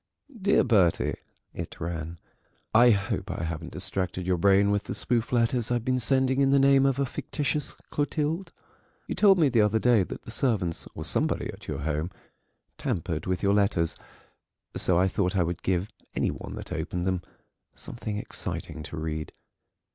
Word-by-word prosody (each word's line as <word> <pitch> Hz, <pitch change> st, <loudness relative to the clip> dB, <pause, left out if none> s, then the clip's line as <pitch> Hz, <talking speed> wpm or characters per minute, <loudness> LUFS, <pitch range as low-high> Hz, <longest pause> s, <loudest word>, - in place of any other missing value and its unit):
"DEAR 200 Hz, -, +4 dB
BERTIE," 100 Hz, -9 st, +3 dB, 0.4 s
it -, -, -7 dB
ran; 85 Hz, 0 st, -4 dB, 0.6 s
"I 120 Hz, +2 st, +7 dB
hope 100 Hz, -3 st, 0 dB
I -, -, -3 dB
haven't 80 Hz, 0 st, -4 dB
distracted 95 Hz, -1 st, -2 dB
your 90 Hz, -1 st, +1 dB
brain 100 Hz, +2 st, +4 dB
with 105 Hz, 0 st, 0 dB
the -, -, -4 dB
spoof 120 Hz, -2 st, 0 dB
letters 120 Hz, -1 st, +1 dB
I've 120 Hz, -1 st, 0 dB
been 130 Hz, 0 st, +1 dB
sending 130 Hz, +2 st, +2 dB
in 135 Hz, -, +4 dB
the 140 Hz, -, +5 dB
name 135 Hz, 0 st, +5 dB
of 135 Hz, -1 st, +1 dB
a 140 Hz, -, +1 dB
fictitious 145 Hz, +2 st, -2 dB, 0.2 s
Clotilde. 155 Hz, +4 st, -1 dB, 0.5 s
You -, -, -3 dB
told 200 Hz, -2 st, +5 dB
me 160 Hz, -4 st, +5 dB
the 120 Hz, -4 st, +3 dB
other 105 Hz, +1 st, +3 dB
day 120 Hz, -1 st, +4 dB
that 90 Hz, -, -5 dB
the -, -, -9 dB
servants, 105 Hz, -10 st, 0 dB
or -, -, -5 dB
somebody -, -, 0 dB
at -, -, -13 dB
your -, -, -3 dB
home, 75 Hz, +3 st, -1 dB, 0.7 s
tampered 80 Hz, -1 st, -2 dB
with 95 Hz, +1 st, -1 dB
your 100 Hz, 0 st, +4 dB
letters, 100 Hz, -5 st, +2 dB, 0.8 s
so 90 Hz, -, +2 dB
I 95 Hz, +2 st, +4 dB
thought 95 Hz, 0 st, 0 dB
I 90 Hz, -, +4 dB
would 85 Hz, 0 st, -3 dB
give 95 Hz, +1 st, 0 dB, 0.3 s
any -, -, +1 dB
one -, -, -7 dB
that -, -, -7 dB
opened 85 Hz, +2 st, -3 dB
them 95 Hz, -1 st, 0 dB, 0.5 s
something 110 Hz, -3 st, -5 dB
exciting 80 Hz, -5 st, -5 dB
to 80 Hz, -, -7 dB
read. 80 Hz, -1 st, -4 dB
100 Hz, 175 wpm, -27 LUFS, 85-130 Hz, 0.8 s, I